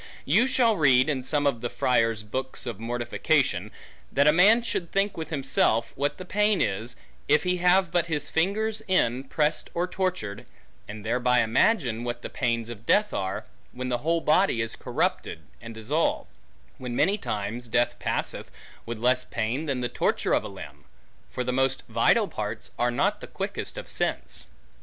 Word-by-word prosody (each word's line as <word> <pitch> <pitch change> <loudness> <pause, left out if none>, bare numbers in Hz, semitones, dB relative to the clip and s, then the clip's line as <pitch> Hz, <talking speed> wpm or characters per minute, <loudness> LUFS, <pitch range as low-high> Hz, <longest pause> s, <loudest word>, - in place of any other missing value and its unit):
You 210 - +4
shall 235 -5 +3
read, 130 -2 +4
in 135 -4 0
some 145 +3 0
of 135 -5 +1
the 120 - -2
friars' 115 -4 +1
books 130 +5 -4
of 115 -5 -5
mortification, 120 - 0 0.4
that 140 - +3
a 150 - +6
man 210 +8 +6
should 175 -7 -2
think 195 +1 +1
with 160 -1 -6
himself, 135 -5 +1
what 145 +2 -1
the 185 - -8
pain 210 +1 +2
is, 105 +4 -2 0.3
if 150 - +4
he 180 0 +1
have 180 0 +3
but 175 -1 +1
his 155 -3 -1
finger's 215 +6 0
end 130 -7 +1
pressed, 155 0 0
or 175 +1 +1
tortured, 180 - -3 0.4
and 105 0 -8
thereby 125 +2 +2
imagine, 120 - +2
what 120 0 -4
the - - -6
pains 115 -2 -1
of 115 -1 -9
death 210 0 +3
are, 95 0 -3 0.3
when 125 0 -4
the 120 -1 0
whole 165 +5 0
body 155 -4 +3
is 115 0 -2
corrupted, - - -2 0.2
and 115 -1 -9
dissolved; 140 +9 -1 0.5
when 125 -2 -5
many 195 +11 +2
times 110 - -4
death 120 +1 +1
passeth, - - -3 0.4
with 120 -1 -4
less 125 +3 +2
pain 120 +8 -3
than 135 -3 -1
the 120 - 0
torture - - 0
of - - +2
a - - -5
limb; 75 -7 -11 0.5
for 125 - -3
the 125 0 -2
most 135 0 +1
vital - - +3
parts, - - -5
are 120 - +2
not 120 - 0
the - - -8
quickest - - -5
of - - -6
sense. - - -2
130 Hz, 180 wpm, -26 LUFS, 115-170 Hz, 0.5 s, a